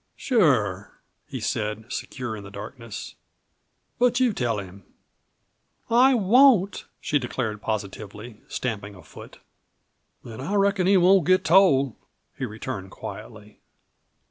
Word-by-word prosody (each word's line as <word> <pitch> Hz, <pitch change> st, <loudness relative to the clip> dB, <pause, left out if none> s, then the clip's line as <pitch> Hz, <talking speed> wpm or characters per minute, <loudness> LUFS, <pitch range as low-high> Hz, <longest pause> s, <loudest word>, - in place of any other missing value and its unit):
"Sure," 120 Hz, -, +1 dB, 0.3 s
he -, -, -6 dB
said, 105 Hz, +1 st, -3 dB
secure 125 Hz, -4 st, -5 dB
in 105 Hz, -, -9 dB
the 100 Hz, -, -10 dB
darkness, 110 Hz, +3 st, -8 dB, 0.9 s
"but 245 Hz, 0 st, +3 dB
you 250 Hz, -4 st, +3 dB
tell 120 Hz, -, -1 dB
him." 100 Hz, -1 st, -9 dB, 1.1 s
"I 255 Hz, +3 st, +5 dB
won't!" 220 Hz, -2 st, +4 dB
she 145 Hz, -, 0 dB
declared 115 Hz, -4 st, -4 dB
positively, 105 Hz, +1 st, -6 dB
stamping 105 Hz, -4 st, -4 dB
a 90 Hz, -, -14 dB
foot. -, -, -13 dB, 0.9 s
"Then 115 Hz, +2 st, -9 dB
I 190 Hz, +10 st, -3 dB
reckon 200 Hz, -2 st, +2 dB
he 195 Hz, 0 st, +5 dB
won't 185 Hz, -1 st, +4 dB
get 185 Hz, 0 st, +3 dB
told," 140 Hz, -, +4 dB, 0.4 s
he 135 Hz, -, -3 dB
returned 110 Hz, -3 st, -6 dB
quietly. 105 Hz, +2 st, -10 dB
125 Hz, 120 wpm, -24 LUFS, -, 1.1 s, I